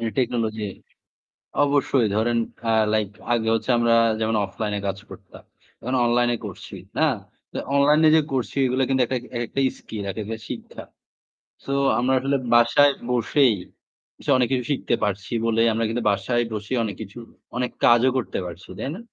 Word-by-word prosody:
এই 115 -1 -1
টেকনোলজি। 115 -4 -1 1.0
অবশ্যই 140 -4 +2
ধরেন 115 +2 +1 0.3
আ - - +3 0.2
লাইক 110 -2 +1 0.2
আগে 115 -2 +1
হচ্ছে 115 - -2
আমরা 115 0 +3 0.3
যেমন 110 0 +1
অফলাইন 105 +2 -4
এ - - -5
কাজ 95 - -3
করতাম। - - -13 0.4
এখন 125 +2 -2
অনলাইন 120 0 +2
এ - - -1
করছি - - -9 0.2
না? - - +4 0.7
অনলাইন 145 +2 +4
এ - - +8
যে - - +5
করছি 130 0 -2
এগুলো 130 +1 0
কিন্তু 130 -1 +2
একটা 130 - -2 0.2
একেকটাই 130 +3 0
স্কিল, 105 -2 -7
একেকটা 110 +2 -5
শিক্ষা। - - -8 0.8
সো - - -4 0.3
আমরা 130 +2 +1
আসলে 140 +2 0 0.2
বাসায় 120 +5 +5 0.2
বসেই 125 0 +3 0.6
এসব - - -1
অনেক 125 -1 +2
কিছু 125 -2 +1
শিখতে 135 -3 0
পারছি 100 0 -2
বলেই 115 0 +3
আমরা 115 +1 0
কিন্তু 115 +1 -2
বাসায় 120 +4 0
বসেই 105 +4 -3
অনেক 105 -3 -3
কিছু 105 +2 -9 0.4
অনেক 125 0 -1
কাজও 120 +2 +5
করতে 130 - -2
পারছি। 85 +1 -9
তাই - - -3
না? - - -8
120 Hz, 165 wpm, -23 LUFS, 110-130 Hz, 1.0 s, এ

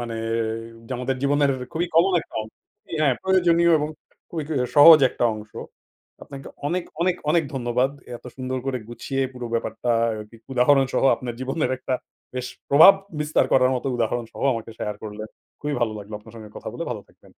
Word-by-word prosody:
মানে 120 -1 -5 0.7
যে, 130 - -6
আমাদের 130 +1 -2
জীবনের 145 0 +3 0.2
খুবই 170 +2 -1
কমন 180 +4 +5
একটা - - -16
অংশ 110 - -13 0.5
হ্যাঁ, 140 -4 +3
প্রয়োজনীয় 170 -3 +3
এবং 150 - -2 0.4
খুবই 165 -2 -4 0.3
সহজ 155 +2 +10
একটা - - -2
অংশ। 110 0 -10 0.7
আপনাকে 135 -1 -10 0.2
অনেক, 175 +4 -1 0.2
অনেক, 180 0 +1
অনেক 170 +1 +3
ধন্যবাদ। 125 +1 0 0.3
এত - - -21
সুন্দর 130 0 -3
করে 130 -2 -1
গুছিয়ে 135 +3 -3
পুরো 125 -1 -6
ব্যাপারটা 115 +1 -2 0.3
এ - - -5
কি 115 - -14 0.2
উদাহরণ 135 +2 +4
সহ - - +1
আপনার 120 -2 -6
জীবনের 130 +1 -1
একটা 130 - -2 0.4
বেশ 125 0 -3 0.2
প্রভাব 155 +7 +9 0.3
বিস্তার 150 +1 +2
করার 130 -1 +5
মতো 125 - -5
উদাহরণ 120 +1 -1
সহ - - -8
আমাকে 115 0 -6
শেয়ার 105 - -3
করলেন। 110 0 -7 0.3
খুবই 150 0 -2
ভালো 115 -2 +1
লাগলো 105 +1 -9
আপনার 110 +1 -16
সঙ্গে 110 -2 -10
কথা - - -7
বলে, - - -5
ভালো - - -4
থাকবেন। - - -22
130 Hz, 180 wpm, -23 LUFS, 120-150 Hz, 0.7 s, সহজ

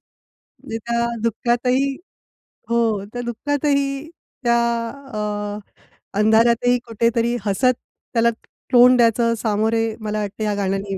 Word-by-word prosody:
म्हणजे 225 - -12
त्या 235 +1 -2 0.2
दुःखातही 240 +3 +1 0.9
हो 235 - +2 0.3
त्या 245 - -4
दुःखातही 280 +3 -1 0.4
त्या 235 0 +3 0.6
अ, - - -3 1.0
अंधारातही 235 +3 +4
कुठेतरी 230 +1 +1
हसत 250 +6 +2 0.4
त्याला 235 0 +4 0.4
तोंड 250 +1 +7
द्यायचं 230 0 +3
सामोरे 220 +1 +1 0.2
मला 215 0 -2
वाटत 205 +1 -5
ह्या 210 -1 0
गाण्याने 195 0 -2
235 Hz, 105 wpm, -21 LUFS, 215-245 Hz, 1.0 s, तोंड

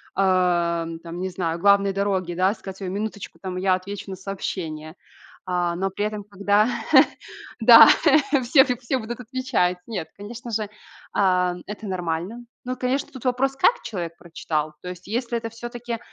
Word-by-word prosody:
ам, 175 -3 +1
там 170 +1 -8
не 185 - -2
знаю, 170 -2 -3
главной 200 +1 +4
дороги, 190 -3 -1
да, 185 +3 +2
сказать: 195 -2 -10
"Ой, 190 - -4
минуточку, 205 0 -5
там 185 -1 -5
я 185 0 +2
отвечу 200 +2 -5
на 190 - -4
сообщение". 170 -4 -5 0.5
А, 175 -1 0
но 195 +2 -1
при 205 +2 -2
этом, 210 -1 -4
когда 205 +2 +2 0.9
Да, - - +10 0.6
всех 265 +2 +5
и - - +1
всё 255 +2 -2
будут 235 +2 -6
отвечать. 245 -8 0
Нет, 195 -8 -4
конечно 235 +4 -8
же, 215 -1 -2 0.4
ам, 180 -2 +2
это 210 +1 -7
нормально. 180 +5 -3 0.2
Но, 255 - -2
конечно, 255 +3 -2
тут 260 -3 -11
вопрос 260 +2 +1
как 485 - +3
человек 170 -5 -5
прочитал? 155 -3 -3
То 180 - -7
есть, 180 0 -9
если 235 +2 -2
это 230 0 -5
всё-таки, 240 0 -6
195 Hz, 165 wpm, -23 LUFS, 180-230 Hz, 0.9 s, Да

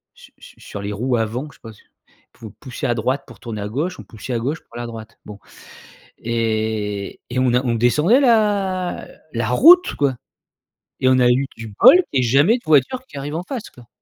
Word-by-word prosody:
su - - -17
su - - -16
sur 100 - -8
les 100 +1 -4
roues 120 +4 -1
avant, 115 +6 -3
que 145 - -15
je - - -25
sais - - -54
pas 115 - -10
s 105 - -18 0.6
pouvait 110 -2 -12
pousser 130 -4 -7
à 120 - +1
droite 130 +5 -1
pour - - -15
tourner 110 -4 -6
à 105 - -4
gauche, 165 +10 -3
on - - -8
poussait 115 +3 -8
à 115 - -1
gauche 145 +7 -3
pour - - -20
aller 120 - -5
à 120 - -6
droite. 115 -1 -10
Bon, 105 -1 -10 0.8
et 110 -3 -3
et 130 - -3
on 130 -2 +2
a 125 - +2
on 120 -2 0
descendait 150 - +3
la 205 -7 +1 0.3
la 115 - -1
route, 350 - +6
quoi! 140 -3 0 0.8
Et 130 - +3
on 130 0 +4
a 125 -1 +4
eu 130 +3 +2
du 110 -2 -9
bol - - +9 0.2
qu'il 130 - +2
y 125 - 0
ait - - -1
jamais 145 - +4
de - - -22
voiture 155 - +2
qui 145 - -13
arrive 145 +3 -5
en 170 - -3
face, 235 +3 -7
quoi. 120 -2 -17
125 Hz, 235 wpm, -20 LUFS, 115-155 Hz, 0.8 s, bol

